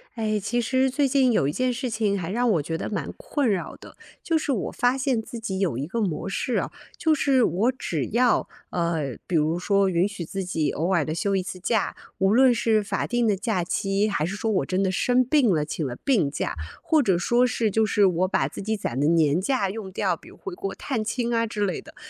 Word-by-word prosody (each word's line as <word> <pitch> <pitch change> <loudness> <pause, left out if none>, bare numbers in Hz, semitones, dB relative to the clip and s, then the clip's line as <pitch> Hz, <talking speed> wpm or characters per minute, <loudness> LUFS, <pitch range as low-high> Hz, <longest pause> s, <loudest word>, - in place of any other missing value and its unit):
哎， 215 -2 0
其 225 +5 -1
实 260 +2 +1
最 280 +1 +2
近 265 -1 +3
有 140 -11 +2
一 - - 0
件 255 +7 0
事 250 +1 -3
情 215 -3 0
还 170 -2 -4
让 240 +5 +1
我 165 -7 +2
觉 160 +3 -3
得 - - -4
蛮 210 - -3
困 295 - -1
扰 190 -4 -2
的。 - - -14 0.2
就 330 - +1
是 310 -2 -1
我 230 -8 -1
发 245 +1 +1
现 265 -3 0
自 230 +1 -7
己 200 -4 -4
有 190 -9 0
一 135 +4 -3
个 230 +7 -3
模 190 -2 -2
式 235 +5 -2
啊， - - -2 0.3
就 315 -1 +3
是 270 -4 +3
我 205 +9 +2
只 165 - -3
要， 240 +1 +3 0.2
呃， 165 -7 -1
比 180 - -2
如 160 +2 +2
说 195 +1 +2
允 180 +1 +2
许 200 -4 -6
自 195 +4 -4
己 160 -4 0
偶 170 +5 -1
尔 170 -4 +3
地 155 +2 -3
休 195 +3 0
一 190 - +1
次 185 0 -6
假， 215 +3 0 0.2
无 195 0 +3
论 255 +2 +6
是 220 -2 +2
法 200 - -2
定 240 -1 +1
的 210 - +3
假 195 -2 -1
期， 195 +3 0
还 200 -7 -1
是 175 +5 -2
说 220 +1 -1
我 190 - +1
真 185 +1 0
的 190 - +1
生 250 +6 +2
病 260 -2 +3
了， 155 -5 +2
请 155 +1 -4
了 130 -4 -3
病 200 - +2
假， - - -3 0.3
或 315 -2 +3
者 195 -9 +2
说 240 +8 +3
是 230 -3 0
就 220 +3 +2
是 210 -1 +3
我 185 0 +2
把 - - +1
自 - - -8
己 220 +2 -1
攒 130 -10 -3
的 145 - +2
年 160 0 +3
假 200 -3 0
用 205 -2 -7
掉， - - 0
比 - - -16
如 - - -16
回 380 - -7
国 385 +2 -5
探 245 -6 -3
亲 235 +2 -1
啊 230 0 +1
之 210 -2 -1
类 185 -4 -2
的。 - - -15
205 Hz, 270 characters per minute, -25 LUFS, 180-245 Hz, 0.3 s, 论